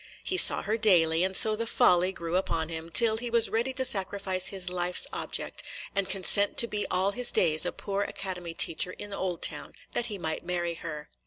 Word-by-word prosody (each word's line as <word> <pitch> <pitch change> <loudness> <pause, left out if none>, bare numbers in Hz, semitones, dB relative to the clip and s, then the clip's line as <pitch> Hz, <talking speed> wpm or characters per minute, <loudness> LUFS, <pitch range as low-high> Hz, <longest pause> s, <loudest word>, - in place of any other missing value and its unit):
He 375 - -3
saw - - +6
her 215 +3 -2
daily, 170 -6 +2
and 190 0 -2
so 215 +2 +5
the 230 +1 -4
folly 180 -3 +2
grew 170 -2 -6
upon 165 -4 -2
him, 165 0 -8
till 220 +5 +5
he 240 +1 -5
was 235 -1 +1
ready 235 +4 -1
to 260 0 -2
sacrifice 195 -3 0
his 190 -2 -2
life's 180 0 +1
object, - - -2 0.3
and 195 -1 -2
consent 200 +1 +2
to - - +6
be 210 -3 -3
all 190 +2 0
his 245 +3 +2
days 160 0 +3
a - - -3
poor 200 0 -5
academy 180 -4 -6
teacher 165 +3 +2
in 205 -1 -9
Oldtown, 185 -3 -1 0.2
that 240 - -2
he 210 - -7
might 160 -3 -5
marry 175 -1 -4
her. 155 -3 -9
190 Hz, 200 wpm, -26 LUFS, 175-210 Hz, 0.3 s, saw